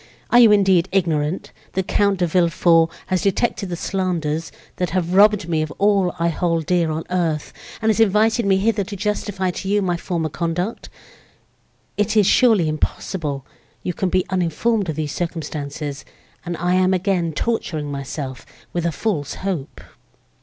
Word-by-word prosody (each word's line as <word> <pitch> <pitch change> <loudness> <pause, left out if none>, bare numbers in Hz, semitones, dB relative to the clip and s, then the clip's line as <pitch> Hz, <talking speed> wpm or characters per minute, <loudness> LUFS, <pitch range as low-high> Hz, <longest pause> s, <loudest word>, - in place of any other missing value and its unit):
Are 245 - +7
you, 230 -3 +8
indeed, 190 -3 +4
ignorant, 165 -3 0 0.2
that 190 -1 -1
Count 200 -1 +2
de 180 - +1
Villefort 170 -1 +3 0.2
has 185 -2 0
detected 200 0 0
the 175 - -2
slanders, 170 -4 -2 0.3
that 180 -2 -1
have 175 -1 -1
robbed 205 -1 +5
me 160 -2 0
of 155 - -2
all 200 -3 +2
I 170 0 +1
hold 165 -1 0
dear 175 -1 +1
on 155 +1 -2
earth, 165 -4 -1 0.3
and 220 - +3
has 215 - -1
invited 220 +2 +3
me 190 -1 +4
hither 205 +1 +1
to 200 +2 -7
justify 200 -2 -2
to 190 - -6
you 205 +1 +2
my 175 -2 0
former 170 -2 -2
conduct? 170 +7 -3 1.1
It 210 +2 +1
is 210 - +5
surely 215 -5 +4
impossible 155 -2 -3 0.4
you 180 - -2
can 185 +2 -1
be 185 0 +1
uninformed 185 +3 0
of 155 - -2
these 150 -2 -3
circumstances, 150 -4 -4 0.4
and 175 -1 -3
I 180 +1 0
am 185 0 +3
again 180 -3 0
torturing 155 -6 -2
myself 140 -1 -5 0.3
with 170 -1 0
a - - 0
false 150 -4 -2
hope!" 170 -8 -3
180 Hz, 165 wpm, -21 LUFS, 160-195 Hz, 1.1 s, you